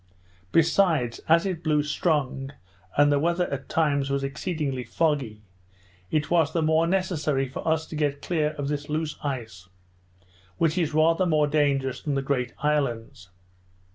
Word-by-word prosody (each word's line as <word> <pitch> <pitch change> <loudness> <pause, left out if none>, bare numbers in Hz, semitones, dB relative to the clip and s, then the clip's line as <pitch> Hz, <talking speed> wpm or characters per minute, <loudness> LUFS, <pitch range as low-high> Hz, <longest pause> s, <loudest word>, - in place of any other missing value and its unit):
Besides, 160 -7 +2
as 170 +3 +5
it 180 -4 -3
blew 150 -2 +2
strong, 145 -3 -1 0.4
and 145 0 +5
the 145 - +3
weather 170 +3 +1
at 135 -1 -6
times 145 -4 +1
was 140 0 -1
exceedingly 140 -2 -3
foggy, 120 -4 -1 0.7
it 150 0 -1
was 165 -4 +3
the 165 - +1
more 160 +1 +3
necessary 155 -7 0
for 130 - -7
us 160 0 +1
to 160 - -8
get 145 -2 0
clear 155 -3 0
of 145 -1 -3
this 145 +1 -3
loose 155 0 -2
ice, 110 -10 -5 0.9
which 160 -1 +2
is 160 -4 -1
rather 165 +4 +3
more 155 -3 +3
dangerous 140 -3 0
than 145 -3 -2
the 135 - -1
great 130 -3 -1
islands. 120 -11 -1
150 Hz, 155 wpm, -25 LUFS, 135-160 Hz, 0.9 s, as